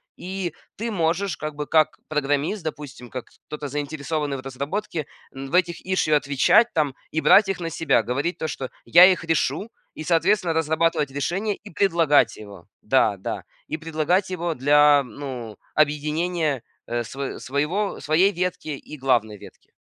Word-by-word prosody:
И 185 -2 -4 0.2
ты 230 +2 -3
можешь, 180 0 0
как 155 -1 -5
бы, 150 0 -4
как 155 0 +2
программист, 150 +6 0
допустим, 145 -6 -7
как 125 -2 -6 0.2
кто-то 150 -1 -5
заинтересованный 145 0 -3
в - - -7
разработке, 140 +5 -4 0.3
м, 135 0 -7
в - - -1
этих 175 -1 +1
issue 185 -5 +1
отвечать 145 - +4
там 150 -5 +1 0.2
и 160 - -1
брать 200 -1 +6
их 195 -2 -2
на 165 - -2
себя. 150 -7 +1
Говорить 140 +10 -2
то, 160 - -3
что 135 -3 -5 0.2
"Я 175 +2 +8
их 185 -2 +3
решу", 165 - 0 0.3
и, 155 - -6
соответственно, 175 +2 +2
разрабатывать 160 -2 +1
решение 185 +10 -1
и 210 - -14
предлагать 165 - +3
его. 100 -4 -12 0.2
Да, 110 -3 +3
да. 95 - -5 0.2
И 155 - -3
предлагать 165 +4 0
его 175 -3 -2
для, 145 +1 +5
ну, 125 -4 -7 0.2
объединения, 150 -1 0 0.2
э, 120 0 -1
сво 135 +4 -5
своего 150 +10 -1
своей 170 +6 +3
ветки 180 -2 -3
и 150 +1 -7
главной 120 -6 +1
ветки. - - -16
155 Hz, 160 wpm, -23 LUFS, 140-175 Hz, 0.3 s, Я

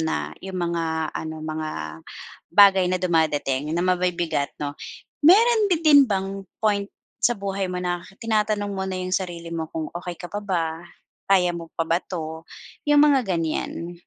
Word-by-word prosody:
na 75 - -2
'yong 190 -1 -6
mga 165 -2 -1
ano 160 0 -5
mga 155 0 -3 0.9
bagay 195 -3 +7
na 185 - +1
dumadating 155 -6 0
na 175 - +1
mabibigat 175 -5 0
'no. 145 -1 -4 0.5
Mayro'n 430 +7 +6
ba 360 - +3
din 305 -3 +7
bang 195 -2 -1 0.3
point 205 -2 0 0.3
sa 240 -1 +3
buhay 195 -1 -3
mo 180 - -4
na 175 -1 -2 0.2
tinatanong 210 -2 0
mo 190 -1 -3
na 190 - -3
'yong 185 0 -4
sarili 170 -3 -3
mo 160 -1 -3
kung 160 -1 -5
okey 175 0 -6
ka 175 - -9
pa 205 - -2
ba, 165 -5 -2 0.5
kaya 180 -3 +4
mo 170 -1 -7
pa 165 - 0
ba 165 +2 +1
'to, 160 -3 -7 0.4
'yong 295 0 +6
mga 290 -2 +5 0.2
ganiyan? 165 +1 -3
180 Hz, 165 wpm, -24 LUFS, 165-200 Hz, 0.9 s, bagay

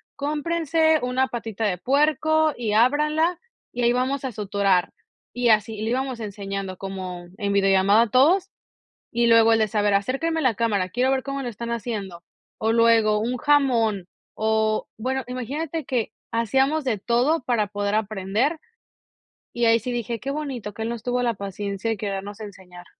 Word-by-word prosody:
"Cómprense 315 +2 +1
una 250 +1 0
patita 225 -3 -4
de 190 -4 0
puerco 310 - +2
y 225 -3 -2
ábranla, 300 +9 +2 0.3
y 245 - -4
ahí 240 0 +4
vamos 260 +2 -1
a 260 - -2
suturar", 200 -3 0 0.4
y 245 -1 +1
así, 215 0 +2
le 220 - -2
íbamos 260 0 -2
enseñando 195 -3 -5
como 185 -2 -6
en 200 -1 -1
videollamada 195 +3 +4
todos, 350 +9 +4 0.6
y 235 0 +2
luego 230 0 +6
el 225 - +3
de: 215 - +2
"Saber, 205 0 +1
acérquenme 275 +11 0
a - - -2
la 255 -4 +2
cámara, 205 -5 0
quiero 255 +6 +1
ver 265 -1 0
cómo 275 0 -4
lo 245 - -4
están 235 +1 -6
haciendo", 205 -7 -5 0.3
o 220 +1 +1
luego 225 -2 +4
un 245 +3 -1
jamón 235 -9 +2 0.3
o 220 0 0
bueno, 260 +4 -2
imagínate 285 +5 -4
que 250 -4 -1 0.2
hacíamos 270 +6 +1
de 245 -4 0
todo 250 +9 +1
para 230 -4 +1
poder 205 0 -2
aprender. 215 - 0 1.0
Y 235 0 0
ahí 230 0 +5
sí 250 +3 -5
dije: 235 -1 -3
"Qué 270 - -5
bonito 265 -8 -5
que 220 - -4
él 225 - -2
nos 235 -2 -5
tuvo 245 0 0
la 235 - +1
paciencia 200 +1 -4
y 225 - -2
querernos 200 0 -5
enseñar". 185 -4 -11
230 Hz, 170 wpm, -23 LUFS, 205-265 Hz, 1.0 s, luego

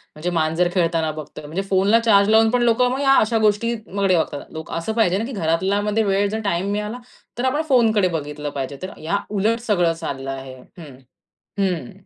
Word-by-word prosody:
म्हणजे 155 +4 -3
मांजर 165 +1 +1
खेळताना 165 -3 +1
बघतोय. 150 -1 -9
म्हणजे 165 +6 -3
फोनला 200 +4 +4
चार्ज 205 -3 +4
लावून 220 0 +5
पण 245 0 +1
लोकं 240 +1 +3
मग 265 +2 -2
या 270 -1 +4
अशा 225 +1 +1
गोष्टीकडे 205 -3 0
बघतात 150 -3 -2
लोकं 160 -1 -8
असं 165 +7 -3
पाहिजे 215 -5 +2
ना, 220 - -2
की 260 - -6
घरातलामध्ये 200 +3 0
वेळ 200 0 +1
जर 220 +2 -3
टाईम 195 +1 0
मिळाला, 210 +3 -3 0.4
तर 245 - -1
आपण 290 +4 +1
फोनकडे 225 -7 +4
बघितलं 150 -3 -4
पाहिजे. 140 0 -5
तर 185 - -5
या 165 +6 -1
उलट 215 +3 0
सगळं 175 -5 +3
चाललं 135 -5 -5
आहे 135 -1 -8 0.2
हं. 150 -6 -11 0.6
हं. 190 0 -1
195 Hz, 190 wpm, -21 LUFS, 160-220 Hz, 0.6 s, लावून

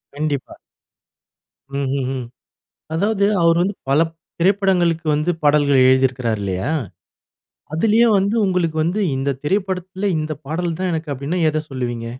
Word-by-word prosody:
கண்டிப்பா. 145 -3 -3 1.2
ம், 140 -1 -1
ம், 130 - -2
ம். 125 -2 -5 0.7
அதாவது, 200 +4 +1 0.2
அவர் 165 0 +4
வந்து, 200 +2 -1 0.2
பல 140 - +4 0.4
திரைப்படங்களுக்கு 180 -4 +2
வந்து 150 +4 0
பாடல்கள் 145 -3 +4
எழுதியிருக்கிறாரு 130 -4 +2
இல்லயா! 95 +7 -2 1.0
அதிலயே 225 +7 +4
வந்து 200 +3 0
உங்களுக்கு 180 -4 0
வந்து 180 +6 0 0.2
இந்த 135 +1 -1
திரைப்படத்தில 190 +2 -1
இந்த 155 0 -3
பாடல் 165 +1 -2
தான் 185 -1 0
எனக்கு, 160 -1 -3
அப்டீன்னா 140 +7 -3
எத 155 0 -1
சொல்லுவீங்க? 120 -3 -4
160 Hz, 130 wpm, -20 LUFS, 135-185 Hz, 1.2 s, அவர்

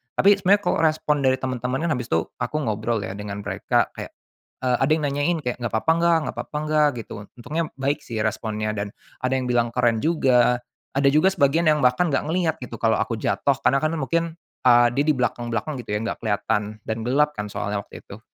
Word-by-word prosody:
Tapi 200 +1 +5
sebenarnya 200 +2 +4
kalau - - +1
respon 155 -2 +2
dari 130 0 +4
teman-teman 130 0 -2
kan - - 0
habis 120 -2 -5
itu 80 0 +2 0.2
aku 125 +4 -3
ngobrol 110 0 -1
ya - - -5
dengan 100 0 -6
mereka, 100 -1 0
kayak - - -7 0.5
eee, 125 -1 +2
ada 135 +3 +1
yang 155 -1 0
nanyain 145 +5 0
kayak, 125 -1 -2
"Enggak 120 - -2
apa-apa, 160 - +2
enggak? 170 0 +4
Enggak - - -5
apa-apa, 150 - -5
enggak?" 155 -1 +3 0.2
gitu. - - -11 0.3
Untungnya 155 +7 -2 0.2
baik 140 +2 0
sih 115 -3 -4
responnya, 110 0 -2
dan 100 -1 -4 0.3
ada 130 - 0
yang 130 -1 -1
bilang 120 -1 +2
keren 120 -2 +2
juga. 125 -7 +3 0.4
Ada 140 0 +3
juga 155 +6 +4
sebagian 160 0 +2
yang 150 - +2
bahkan 125 +7 +3
enggak - - +1
ngelihat 165 -2 +1
gitu 120 - -7
kalau 110 -1 +3
aku 110 +1 -1
jatuh, 140 +5 +1
karena 135 - +4
kan 155 - +2
mungkin, 165 +4 0 0.4
eee, 120 -1 +7
dia 140 - +2
di 155 - +4
belakang 125 -1 -1
belakang 115 +7 -2
gitu 110 - -9
ya, - - 0
enggak 115 - -3
kelihatan 105 0 -1
dan 110 - -2
gelap 150 +4 +3
kan 105 - -4
soalnya 100 0 -2
waktu - - -13
itu. - - -11
125 Hz, 215 wpm, -23 LUFS, 115-150 Hz, 0.5 s, eee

